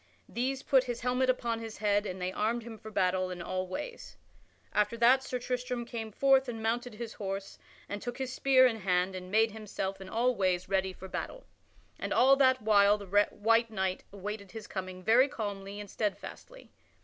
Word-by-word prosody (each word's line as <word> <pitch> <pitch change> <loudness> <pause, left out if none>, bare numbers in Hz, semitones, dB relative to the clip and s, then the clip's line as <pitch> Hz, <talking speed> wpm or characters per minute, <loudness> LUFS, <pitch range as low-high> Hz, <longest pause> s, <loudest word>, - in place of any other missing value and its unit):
These 260 +3 -2
put 265 -2 +4
his 240 -1 -4
helmet 250 +1 +1
upon 235 -2 0
his 225 -1 -7
head 205 0 +1
and 185 0 -5
they 180 0 -2
armed 225 +4 -1
him 225 -2 -9
for 220 - -9
battle 185 -2 +1
in 180 -1 -6
all 185 +2 -3
ways. 475 - -7 0.6
After 210 +2 +1
that 245 +3 +5
Sir 255 - -3
Tristram 250 0 -3
came 225 -2 -5
forth 270 +2 +3
and 225 -2 -5
mounted 235 +1 -1
his 230 0 -6
horse 195 -1 -5 0.3
and 205 0 -5
took 245 0 -5
his 260 -1 -3
spear 265 -1 +5
in 235 -3 +2
hand 185 -2 +1
and 185 -1 -7
made 220 +2 +3
himself 195 -2 -5
in 190 - -8
all 245 +4 +2
ways 185 -4 0
ready 190 -1 +1
for 190 +1 -10
battle, - - -6 0.5
and - - -4
all 265 +2 +6
that 260 -4 +4
while 205 -1 +5
the 205 - -9 0.2
white 230 +2 +2
knight 190 -3 -2
awaited 200 0 -6
his 220 -2 -7
coming 185 -2 -6
very 235 +7 +5
calmly 200 -4 -5
and 205 - -7
steadfastly. 230 - -5
220 Hz, 195 wpm, -30 LUFS, 195-245 Hz, 0.6 s, all